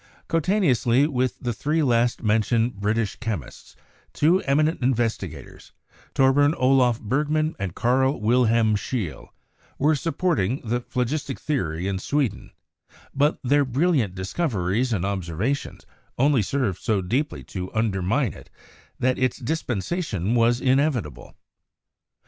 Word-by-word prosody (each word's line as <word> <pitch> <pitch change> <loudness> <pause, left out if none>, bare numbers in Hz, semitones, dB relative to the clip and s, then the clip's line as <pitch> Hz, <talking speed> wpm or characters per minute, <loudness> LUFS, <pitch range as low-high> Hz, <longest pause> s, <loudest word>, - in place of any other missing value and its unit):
Coetaneously 160 - +2
with 130 -4 -1
the 120 -1 -2
three 150 +7 0
last 120 -2 +1
mentioned 115 +1 +1
British 105 +2 -1
chemists, 110 - -6 0.4
two 170 +6 +3
eminent 155 +3 +1
investigators, 115 - -3 0.4
Torbern 145 +3 +4
Olaf 125 -2 +3
Berg 135 +8 -1
man 155 +1 0
and 95 -3 -4
Karl 130 +3 +1
Wilhelm 115 -1 +3
Scheele, 105 -5 -4 0.5
were 150 +3 +3
supporting 150 - 0
the 120 +1 -1
phlo 125 +1 -2
gistic 140 +1 -3
theory 90 - -2
in 95 -1 -2
Sweden, 140 0 -1 0.6
but 145 +3 +2
their 145 +3 +3
brilliant 130 - +1
discoveries 105 - -1
and 95 -5 0
observations 100 - -3 0.3
only 135 -1 +3
served 105 -3 -1
so 105 -4 0
deeply 135 - -2
to 95 -1 -6
undermine 110 +3 0
it - - -14 0.5
that 130 0 0
its 130 -2 +1
dispensation 120 - -2
was 120 0 +3
inevitable. 130 - 0
125 Hz, 120 wpm, -24 LUFS, 105-145 Hz, 0.6 s, Torbern